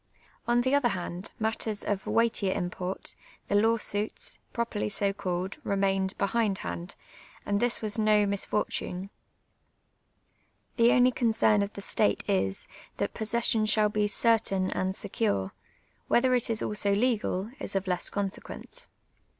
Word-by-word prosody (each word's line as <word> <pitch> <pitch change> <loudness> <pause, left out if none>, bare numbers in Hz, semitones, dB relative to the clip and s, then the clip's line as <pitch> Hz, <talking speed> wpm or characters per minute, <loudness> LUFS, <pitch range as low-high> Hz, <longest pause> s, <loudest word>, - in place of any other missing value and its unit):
On 240 0 +3
the 260 +2 +1
other 285 -3 +4
hand, 180 -1 -5
matters 220 -1 -1
of 200 -2 -2
weightier 225 -4 +2
im])ort, 180 +1 -4 0.4
the - - 0
law 225 +3 +4
suits, 210 -1 -3
pro 235 - 0
perly 210 -2 -3
so 200 0 0
called, 185 -1 -3
ri'mained 195 -1 0
behindhand, 195 - -1 0.5
and 205 0 +1
this 240 0 +1
was 215 +1 -1
no 215 -1 +4
mis 200 -1 0
fortune. 190 -2 -2 1.7
The 235 0 +6
only 250 0 +5
concern 220 -4 +3
of 200 +1 -2
the 200 - -6
state 100 - +1
is, 95 0 0 0.3
that - - -1
possession 220 0 +1
shall 215 0 +4
be 210 0 +1
certain 205 -3 +2
and 190 0 -1
secure; 195 - -1 0.6
whether 255 +1 +3
it 245 -2 +1
is 225 -1 0
also 205 -1 0
legal, 215 -3 0
is - - -4
of 195 0 0
less 180 -2 0
consequence. 205 - -5
205 Hz, 140 wpm, -28 LUFS, 190-230 Hz, 1.7 s, The